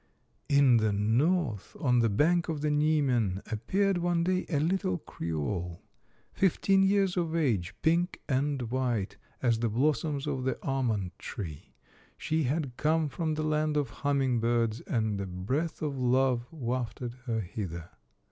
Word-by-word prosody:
In 140 -4 +5
the 110 -1 +2
North, 115 - 0
on 125 -6 +3
the 115 -1 +3
bank 165 - +2
of 155 -3 -2
the 150 0 +1
Niemen, 135 -10 +1
ap 110 -1 -5
peared 195 -1 +2
one 175 -1 +1
day 185 +1 0
a 150 -5 +1
little 160 - 0
creole, 85 +2 -4 0.5
fifteen 195 +1 +3
years 195 -1 +2
of 165 -2 0
age, 110 - 0
pink 170 +3 +2
and 140 -1 0
white 120 -6 -1 0.3
as 115 -3 +2
the 115 0 0
blossoms 145 +4 0
of 135 -3 -2
the 130 - -1
almond 115 -9 0
tree. 85 - -7 0.4
She 155 -1 0
had 135 -2 -2
come 155 0 +1
from 155 +1 -2
the 155 - -2
land 155 0 +1
of 145 -2 0
humming 135 -4 +1
birds, 115 -1 +1
and 110 -4 0
a 95 - -4
breath 130 - -2
of 140 -3 -2
love 125 -1 +2
wafted 125 -4 -3
her 115 -2 0
hither. 90 -3 -6
130 Hz, 155 wpm, -29 LUFS, 110-155 Hz, 0.5 s, In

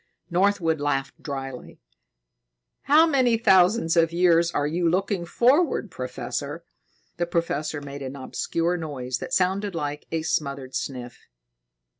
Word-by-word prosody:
Northwood 175 -4 +2
laughed 135 -2 -2
dryly. 135 -3 -7 1.1
"How 305 +3 +6
many 260 -7 +3
thousands 190 -3 +4
of 165 -1 +3
years 170 -1 +4
are 145 -4 -1
you 170 +3 +1
looking 185 0 -1
forward, 255 - +2
Professor?" 135 +5 -5 0.5
The 175 0 -1
professor 155 -3 -2
made 140 0 -8
an 135 0 -6
obscure 165 +5 -2
noise 130 -6 -4
that - - -7
sounded 190 -2 0
like 150 -2 -4
a 160 -1 -1
smothered 140 -4 -2
sniff. 125 -3 -5
165 Hz, 125 wpm, -25 LUFS, 140-185 Hz, 1.1 s, How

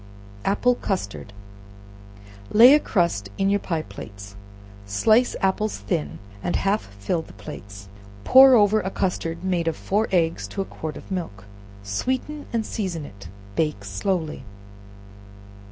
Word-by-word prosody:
Apple 250 +5 +3
Custard. 180 - -4 1.2
Lay 240 +5 +9
a 300 - +6
crust 170 - 0
in 195 0 +2
your 205 - +2
pie 165 -5 -2
plates, 100 -5 -10 0.5
slice 220 - +3
apples 200 +3 0
thin 80 -6 -3 0.2
and 175 - -2
half 200 +2 0
fill 130 - -1
the - - -14
plates, 100 -8 -10 0.4
pour 265 - +8
over 210 -1 +4
a 190 - -3
custard 180 -3 -2
made 180 -3 0
of 165 - 0
four 210 +3 0
eggs 170 -3 +1
to - - -8
a - - -3
quart 155 -4 -6
of - - -12
milk, 130 - -5 0.4
sweeten 260 - -3
and 230 -2 -1
season 180 -8 -3
it; 100 -6 -12 0.3
bake 150 -10 0
it - - -13
slowly. 155 - -2
175 Hz, 140 wpm, -24 LUFS, -, 1.2 s, Lay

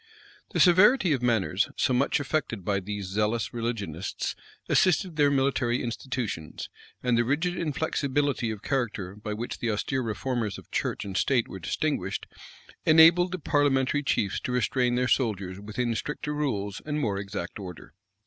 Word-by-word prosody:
The - - -1
severity 185 - +6
of 130 - -1
manners, 110 -5 +1
so 130 - +2
much 135 +4 +2
affected 140 - -2
by 100 -1 +1
these 100 +1 -5
zealous 105 +5 -1
religionists, 105 -7 -3 0.3
assisted 180 -1 +2
their 145 -1 +4
military 135 -3 +1
institutions 115 - -4 0.3
and 125 -1 +2
the 120 - +3
rigid 160 +8 0
inflexibility 145 -5 0
of 110 -1 -5
character 110 -8 -2
by 105 0 -5
which 120 +3 -5
the 120 - -1
austere 130 +5 -1
reformers 115 -2 -2
of - - -14
church - - -2
and 95 -2 -6
state 125 +2 +2
were 95 - -8
distinguished, 95 - -2 0.6
enabled 165 +3 +6
the 185 - -2
parliamentary 145 -2 +2
chiefs 100 -8 0
to 130 - -4
restrain 125 0 +1
their 125 0 +1
soldiers 100 -8 0
within 115 +4 -2
stricter 150 +5 -3
rules 105 -10 -2
and 150 0 -2
more 105 -8 0
exact 100 -2 -5
order. 90 -4 -9
120 Hz, 155 wpm, -27 LUFS, 105-145 Hz, 0.6 s, severity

